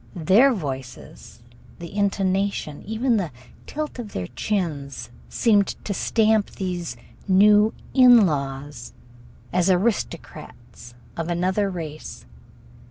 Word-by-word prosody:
Their 195 - +4
voices, 135 - -7 0.3
the 170 +2 -9
intonation, 195 -5 -1
even 230 +2 +1
the 185 -5 -2 0.4
tilt 305 -3 -5
of 220 -4 -7
their 90 - -3
chins, 140 - -4 0.2
seemed 205 -4 +3 0.2
to 205 - -2
stamp 220 +1 +2
these 175 -9 -5 0.3
new 210 +3 +5 0.2
"in 245 -4 +7
laws" 140 -4 -4 0.6
as 180 +1 +2
aristocrats 160 - -3 0.2
of 165 -1 -4
another 185 +4 0
race. 160 -4 -7
185 Hz, 100 wpm, -23 LUFS, 150-210 Hz, 0.6 s, in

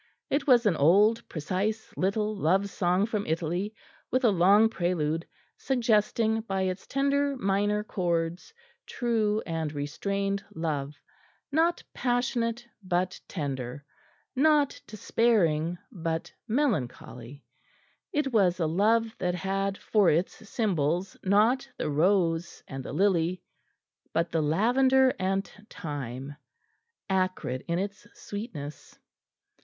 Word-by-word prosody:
It 280 +1 0
was 245 -3 +5
an 200 -5 +3
old 205 +10 +5
precise 195 +8 -2
little 210 +3 0
love 195 +2 +1
song 180 +2 +1
from 215 -2 -3
Italy, 175 +6 -2 0.3
with 255 +2 +1
a 230 - +5
long 200 +4 +5
prelude, 170 -5 -1 0.3
suggesting 225 -3 +1
by 195 -3 -2
its 185 0 -3
tender 280 0 +1
minor 205 0 +1
chords 175 - -2 0.4
true 220 -3 0
and 160 -3 -2
restrained 195 +7 -2
love, 150 -3 -2 0.6
not 330 +4 +2
passionate 240 -1 -1
but 185 -1 -1
tender, 140 -4 -4 0.5
not 295 0 +3
despairing 180 -7 +1
but 165 -5 -3
melancholy; 140 - -2 0.7
it 290 -4 -1
was 185 -5 +3
a 165 - +1
love 220 +7 +2
that 180 -1 0
had 195 +2 -1
for 205 -5 +3
its 170 +5 +1 0.2
symbols 180 - 0
not 215 +7 +3
the 150 - -2
rose 170 +1 +1
and 135 -1 -6
the - - -7
lily, 180 0 +1 0.7
but 165 +1 0
the 165 - +1
lavender 255 - +3
and 195 +1 0 0.2
thyme 140 -3 -6 0.7
acrid 185 -9 -1
in 170 0 0
its 200 +2 -4
sweetness. 185 - -7
195 Hz, 115 wpm, -28 LUFS, 165-220 Hz, 0.7 s, was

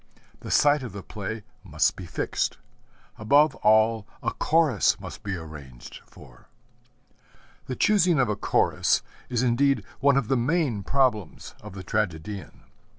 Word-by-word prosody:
The - - -9
site 145 0 +4
of 125 -7 -7
the 100 -2 -8
play 105 +1 -6 0.2
must 75 -6 +1
be - - -9
fixed. - - -2 0.6
Above 145 +8 +4
all, 110 0 +3 0.2
a - - 0
Chorus 150 - +2
must - - -9
be 100 -2 -4
arranged 75 -7 -10
for. - - -17 1.2
The 130 - -3
choosing 185 -5 +3
of 125 - +3
a 105 - -1
Chorus - - +1 0.3
is 125 -1 0
indeed 135 +3 +2 0.2
one 140 -1 +4
of 135 -5 0
the 135 - +2
main 130 - 0
problems 120 - -1
of 105 -2 -10
the 95 -1 -8
tragedian. 100 -1 -4
110 Hz, 145 wpm, -25 LUFS, 100-135 Hz, 1.2 s, site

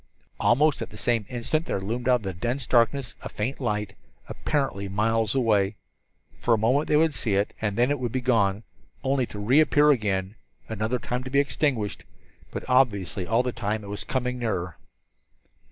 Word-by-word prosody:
Almost 145 +4 +3
at - - -4
the - - -12
same 115 -4 0
instant 125 +7 -1
there - - -1
loomed 115 +6 -2
out 125 - +6
of 120 - -3
the 95 -1 -3
dense 120 +9 -2
darkness 120 +1 +2
a - - -6
faint 115 +6 -3
light, 105 -6 -2 0.3
apparently 135 -10 -2
miles 110 +3 +1
away. 105 -5 +2 0.6
For 120 - +3
a - - -1
moment 130 +8 +2
they 150 - +3
would 160 0 +3
see 110 -4 0
it, 100 +1 0
and 105 -2 -1
then 120 +3 +3
it 145 - 0
would 120 -3 -2
be 130 - -1
gone, 110 -5 +1 0.4
only 135 -2 +1
to - - -9
reappear 145 +7 +4
again, 100 -6 0 0.3
another 110 +3 -1
time 125 +2 -4
to - - -5
be 140 +2 +3
extinguished. 140 -7 0 0.5
But - - -6
obviously 100 -9 +1
all 115 +2 +2
the 125 - -1
time 110 -2 -3
it 100 - -9
was 105 - -5
coming 125 -2 -2
nearer. 90 -8 -2
115 Hz, 185 wpm, -26 LUFS, 105-130 Hz, 0.6 s, out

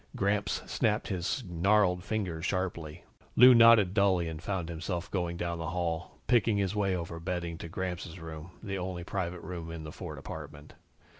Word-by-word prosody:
Gramps 100 +1 0
snapped 105 -1 0
his 95 +7 -1
gnarled 90 +1 +3
fingers 90 -7 -2
sharply. 85 -4 -3 0.3
Lou 125 +1 +9
nodded 115 -5 +7
dully 95 -4 +3
and 80 -1 -6
found 90 -3 -2
himself 85 +2 -4
going 85 -3 -1
down 85 -1 -2
the 80 -1 -3
hall, 85 -1 -3
picking 115 -3 +3
his 100 0 0
way 100 -2 +1
over 85 -1 -5
bedding 85 -1 -3
to 85 - -7
Gramps' 90 -1 -4
room, 80 0 -8
the 95 -3 -3
only 90 -1 -4
private 90 -2 -3
room 85 -2 -6
in 80 -1 -6
the 75 - -7
Ford - - -7
apartment. 75 0 -9
90 Hz, 170 wpm, -30 LUFS, 85-100 Hz, 0.3 s, Lou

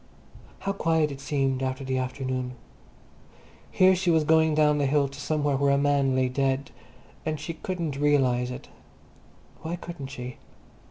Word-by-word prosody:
How 195 - -1
quiet 160 -5 +1
it 140 0 -8
seemed 135 -3 0
after 130 0 -2
the 130 0 -1
afternoon. 130 -1 -3 1.2
Here 185 0 +5
she 185 0 0
was 160 -2 +4
going 160 0 +4
down 150 -1 +3
the 140 - +2
hill 140 0 +2
to 140 +1 -11
somewhere 145 -1 0
where 140 +1 +2
a 140 - +4
man 140 -2 +2
lay 130 0 +2
dead, 135 +1 -1 0.5
and 155 -1 -2
she 150 +3 -5
couldn't 165 -5 -4
realize 130 -4 +2
it. 125 - -7 0.9
Why 160 +3 -3
couldn't 170 -5 -7
she? 125 -2 -7
140 Hz, 160 wpm, -26 LUFS, 130-155 Hz, 1.2 s, Here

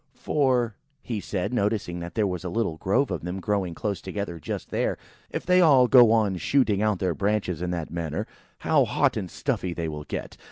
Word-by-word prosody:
"For," 125 -6 +1 0.4
said 95 0 -3
he, - - -2
(noticing 100 -5 -1
that 85 0 -7
there 110 - +2
was 90 -3 -3
a 90 - -3
little 85 -4 -1
grove 110 - +1
of 90 - -2
them 90 +3 -4
growing 95 -3 -1
close 100 +1 -3
together 95 -3 -5
just - - -5
there,) - - 0 0.3
"if - - -5
they 180 0 +5
all 135 -7 +6
go 120 -3 +7
on, 105 -5 +2
shooting 105 - +2
out 105 -2 +2
their 90 -1 0
branches 100 -3 -1
in 90 - -2
that 85 -3 -3
manner, 80 -2 -3 0.4
how - - +4
hot - - +1
and - - -3
stuffy 90 -2 -2
they 85 -1 -2
will 75 -1 -6
get! - - -6
100 Hz, 205 wpm, -26 LUFS, 85-115 Hz, 0.4 s, go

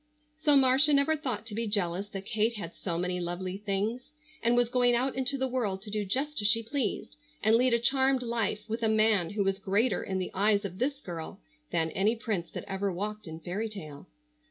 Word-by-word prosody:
So 300 -2 +5
Marcia 270 +3 +6
never 280 +3 +4
thought 250 -8 -3
to 225 - -7
be 230 +2 -2
jealous 200 -1 -1
that 195 -1 -7
Kate 220 +2 0
had 170 -5 -6
so 170 -3 -4
many 180 +1 -1
lovely 180 +2 -4
things, 210 +4 -2 0.3
and 235 +1 +3
was 245 -1 +4
going 245 0 +3
out 260 +3 0
into 265 +1 0
the 265 0 0
world 215 -7 -2
to 210 - -8
do 210 -1 -1
just 275 +7 -1
as 205 - +3
she 230 +2 +4
pleased, 245 +2 -3 0.3
and 220 +1 +5
lead 250 0 +4
a - - +1
charmed 265 +1 +2
life 230 -3 -1
with 225 +1 -3
a 225 - +2
man 215 -5 +3
who 205 0 -1
was 195 0 0
greater 205 +6 +1
in 190 - -3
the 185 - -3
eyes 205 +1 +2
of 185 0 -6
this 275 +2 -1
girl 175 - -7 0.3
than 160 -2 0
any 210 +7 +1
prince 215 -7 -3
that - - -7
ever 195 0 -1
walked 210 +3 -5
in 160 0 -8
fairy 200 +7 -3
tale. 155 -6 -9
215 Hz, 220 wpm, -29 LUFS, 195-245 Hz, 0.3 s, Marcia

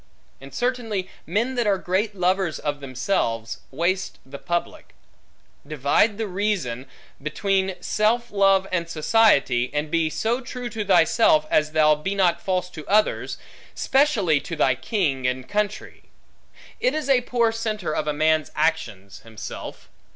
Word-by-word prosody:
And 135 0 -11
certainly, 230 -6 -2 0.2
men 225 +9 0
that 240 -3 0
are 200 -1 +3
great 195 +4 -1
lovers 185 -2 0
of 145 -1 -3
themselves, 120 - -2
waste 175 +7 -1
the 135 +1 -9
public. 175 0 -4 0.7
Divide 155 - +2
with - - -4
reason; 180 - -2 0.3
between 190 +5 0
self 235 +3 +1
love 195 -1 +3
and 170 -2 -1
society; 155 - +3
and 150 +1 -2
be 165 -2 +1
so 230 +9 -1
true 245 -1 -6
to 215 0 -3
thyself, 180 -3 +4
as 155 0 +2
thou 155 -1 +5
be 170 +7 -3
not 175 -3 +2
false 180 -1 -2
to 155 -4 -10
others; 210 +2 +1 0.4
specially 245 - +2
to 165 - -6
thy 135 -4 +3
king 135 - -1
and 125 0 -3
country. 210 0 -3 0.7
It - - +1
is 310 -3 -2
a 265 -3 +4
poor 235 -2 +1
centre 215 -7 -3
of 155 - -2
a - - +2
man's 155 +1 +1
actions, 120 -12 -2
himself. 110 -2 -9
180 Hz, 145 wpm, -23 LUFS, 150-210 Hz, 0.7 s, thou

